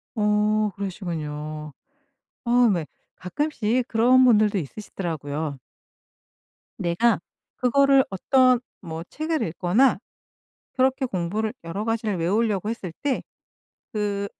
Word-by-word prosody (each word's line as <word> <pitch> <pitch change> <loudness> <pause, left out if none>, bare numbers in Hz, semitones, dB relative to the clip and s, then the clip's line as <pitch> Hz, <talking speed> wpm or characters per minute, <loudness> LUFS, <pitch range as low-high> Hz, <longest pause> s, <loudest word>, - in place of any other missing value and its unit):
어 210 0 +2
그러시군요. 155 -6 -5 0.7
어 240 0 +4
왜 170 -4 -1 0.3
가끔씩 245 +1 -1
그런 245 +3 +5
분들도 215 -4 +4
있으시더라고요. 155 -4 -4 1.2
내가 190 +6 +2 0.4
그거를 275 +1 +4
어떤 255 +5 +3 0.2
뭐 160 0 -6
책을 315 0 -2
읽거나 190 +7 +2 0.7
그렇게 260 +1 +2
공부를 210 +1 -2
여러 190 +6 -4
가지를 225 -3 -1
외우려고 205 +3 0
했을 210 -6 -5
때 280 -2 0 0.7
그 205 -1 -1
210 Hz, 230 characters per minute, -24 LUFS, 175-245 Hz, 1.2 s, 그런